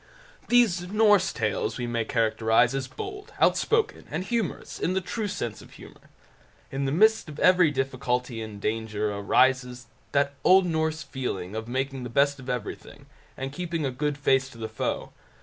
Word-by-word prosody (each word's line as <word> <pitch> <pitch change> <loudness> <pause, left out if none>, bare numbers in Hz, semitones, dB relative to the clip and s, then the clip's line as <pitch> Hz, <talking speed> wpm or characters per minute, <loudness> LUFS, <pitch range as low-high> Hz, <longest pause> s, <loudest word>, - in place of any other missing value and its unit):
These 210 -8 +3
Norse 205 -2 +4
Tales 110 0 -1
we 120 - -3
may 115 -1 -1
characterize 115 +2 +2
as 135 -1 -2
bold, 410 +1 -8
out - - +5
spoken, 445 -2 0
and 160 +5 -3
humorous, 225 0 -3
in 180 - 0
the - - +3
true 210 +4 -3
sense 120 - -4
of - - -15
humour. - - -15 0.6
In 135 +1 -2
the 135 - 0
midst 215 +2 +3
of 150 - -9
every 180 -2 +5
difficulty 125 -3 -2
and 110 -2 -7
danger 105 -1 -2
arises 125 +4 +2 0.3
that 140 0 +2
old 190 0 +6
Norse 160 -2 -1
feeling 100 -9 -4
of 110 0 -4
making 135 +2 -2
the 125 - -5
best 140 +3 +2
of 130 - -9
everything, 125 -4 -5 0.3
and 135 +1 -5
keeping 165 -2 -3
a 135 - -1
good 145 +3 -2
face 135 -1 +2
to 120 - -14
the 110 -1 -4
foe. 110 - -3
135 Hz, 175 wpm, -26 LUFS, 120-180 Hz, 0.6 s, old